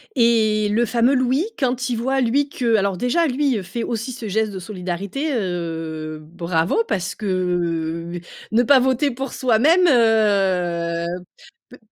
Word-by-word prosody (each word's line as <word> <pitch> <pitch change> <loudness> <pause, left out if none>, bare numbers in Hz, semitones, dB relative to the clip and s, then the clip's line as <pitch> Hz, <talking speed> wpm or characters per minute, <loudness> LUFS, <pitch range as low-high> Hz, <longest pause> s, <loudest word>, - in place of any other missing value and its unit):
Et 220 -3 +3
le 230 +3 +2
fameux 240 +3 +2
Louis, 260 +5 +1
quand 255 -2 -1
il 245 - 0
voit 265 +4 0
lui 270 +4 +1
que 235 -5 0
alors 200 -3 +1
déjà 255 - +1
lui 270 -2 0
heu, 200 - -4
fait 230 +6 -5
aussi 230 +2 -3
ce 240 -3 -7
geste 215 +1 0
de 190 - -6
solidarité, 195 - -4
heu, 165 -6 -4
bravo! 170 - -1
Parce 185 - -2
que 170 -4 -2 0.4
ne 230 +3 +3
pas 265 +2 +6
voter 260 +2 +1
pour 265 +2 -5
soi-même 280 +9 +3
heu, 190 - +2 0.6
peu 250 - -14
220 Hz, 150 wpm, -21 LUFS, 180-255 Hz, 0.6 s, pas